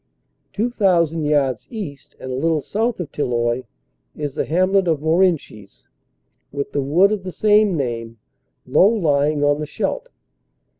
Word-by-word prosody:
Two 225 +4 -1
thou 190 -8 +3
sand 160 -1 -4
yards 135 -6 0
east 160 - -8
and 130 - -6
a - - -2
little 155 +2 0
south 225 +2 -1
of 160 -5 -5
Tilloy 120 -2 -1 0.5
is 145 -2 -4
the - - -2
hamlet 185 +4 +2
of 160 -3 +1
Morenchies, 160 - 0 0.6
with 140 0 -4
the 145 - -1
wood 170 +9 +3
of 210 -2 -1
the 185 0 -6
same 210 -2 +3
name, 115 -4 -4 0.5
low 190 - +4
lying 150 -8 +1
on 145 0 +2
the 150 - -4
Scheldt. - - -3
155 Hz, 155 wpm, -20 LUFS, 140-190 Hz, 0.6 s, low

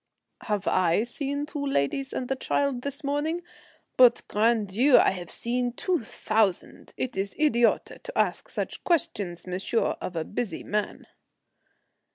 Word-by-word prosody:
"Have 205 -3 -1
I 185 +2 +3
seen 285 +4 -3
two 295 -1 -5
ladies 270 - 0
and 255 - -3
a - - +2
child 270 -1 0
this 280 +2 -3
morning? 300 +5 -1 0.5
But, 250 -2 +6
grand 220 -1 +2
Dieu, 250 +8 +5
I - - +5
have 175 -3 -6
seen 245 0 -1
two 350 +2 -1
thousand. 215 -3 -1
It 255 -1 -3
is 195 +1 -3
idiote 240 -7 +2
to - - -8
ask - - 0
such - - -4
questions, 290 - -1
monsieur, 185 +5 0
of 180 - -5
a 165 - -1
busy 225 0 -4
man." 210 0 -3
240 Hz, 150 wpm, -27 LUFS, 200-280 Hz, 0.5 s, But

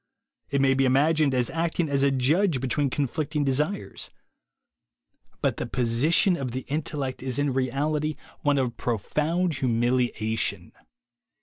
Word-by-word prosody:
It 140 -1 +1
may 135 -1 +4
be 135 0 +2
imaged 150 +3 +3
as 125 -2 0
acting 165 0 -1
as 140 -1 +1
a 140 - +4
judge 140 +5 +2
between 135 +2 0
conflicting 145 +2 -1
THE 135 - +2
WAY - - +1
TO - - +4
WILL 150 - +2
POWER - - -3
9 200 - -6
desires. - - -10 1.3
But - - +1
the - - -3
position 135 - +2
of 130 -6 -4
the 130 - -3
intellect 145 -2 -3
is 130 -1 -1
in 145 -2 +1
reality 145 +4 -1 0.3
one 145 -1 +2
of 125 -3 -1
profound 150 - -1
humiliation. 115 -6 0
135 Hz, 165 wpm, -26 LUFS, 125-155 Hz, 1.3 s, may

